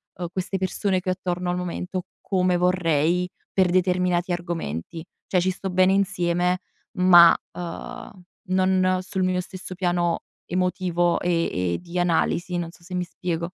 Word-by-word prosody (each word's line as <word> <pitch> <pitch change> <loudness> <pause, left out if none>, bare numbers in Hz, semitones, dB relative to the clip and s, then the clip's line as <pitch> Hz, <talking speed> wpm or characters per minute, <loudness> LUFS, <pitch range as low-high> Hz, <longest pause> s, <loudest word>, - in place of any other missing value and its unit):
uhm, 175 - -4
queste 190 +1 -2
persone 190 +1 0
che 185 0 -4
ho - - +3
attorno 180 0 -3
al 180 - -1
momento, 180 +1 -4 0.2
come 185 -2 +1
vorrei 175 -1 +2 0.2
per 185 -2 +3
determinati 180 0 +1
argomenti. 165 - -4 0.2
Cioè 185 - +2
ci 185 +1 +1
sto 190 +1 -5
bene 185 +1 +4
insieme, 180 -2 +1 0.4
ma, 175 -2 +8 0.2
uhm, 180 +8 -7 0.4
non 185 0 +2
sul 190 0 -2
mio 185 0 +1
stesso 185 0 -8
piano 175 -1 0 0.3
emotivo 180 -1 +1
e 165 - 0
e - - -4
di 175 0 -7
analisi, 175 +1 +1
non 170 -1 -3
so 175 - -20
se 180 +2 -10
mi 180 - 0
spiego. 170 -1 -3
180 Hz, 155 wpm, -24 LUFS, 175-185 Hz, 0.4 s, ma